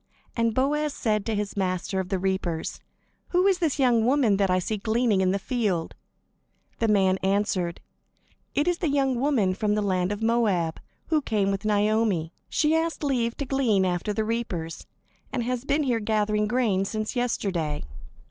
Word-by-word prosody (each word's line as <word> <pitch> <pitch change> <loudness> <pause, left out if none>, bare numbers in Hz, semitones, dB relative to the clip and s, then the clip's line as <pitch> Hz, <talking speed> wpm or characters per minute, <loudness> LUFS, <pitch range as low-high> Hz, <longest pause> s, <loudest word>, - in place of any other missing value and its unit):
And 230 -1 +1
Boaz 295 +3 +1
said 215 -3 0
to 225 - 0
his 205 -1 -3
master 190 0 -1
of 185 -1 -3
the 190 - 0
reapers: 185 -3 -2 0.5
"Who 360 +1 +2
is 385 -2 +3
this 325 -6 0
young 245 -5 +3
woman 245 -5 +3
that 195 -1 +2
I 185 - +3
see 210 +4 -2
gleaning 220 -1 +1
in 185 - +2
the 195 - +1
field?" 200 -6 -1 0.9
The 230 - +2
man 190 -3 +3
answered: 190 -3 0 0.7
"It 290 - +1
is 355 -1 +1
the 330 - 0
young 270 -3 +1
woman 245 -9 +2
from 210 +1 0
the 210 - +1
land 185 -1 0
of 205 +2 -3
Moab, 210 -8 +1 0.3
who 315 -2 +2
came 205 -6 0
with 195 +2 -3
Naomi. 210 -5 +1 0.2
She 310 0 +2
asked 325 -1 -1
leave 240 -5 0
to 280 - -3
glean 245 -8 +2
after 180 +3 -1
the 215 +1 -1
reapers, 190 -8 -3 0.4
and 250 -3 -1
has 250 +1 -2
been 285 +2 +1
here 245 -4 +1
gathering 210 -1 +1
grain 215 -5 +1
since 215 +4 -3
yesterday." 185 -11 -1
215 Hz, 175 wpm, -26 LUFS, 190-250 Hz, 0.9 s, is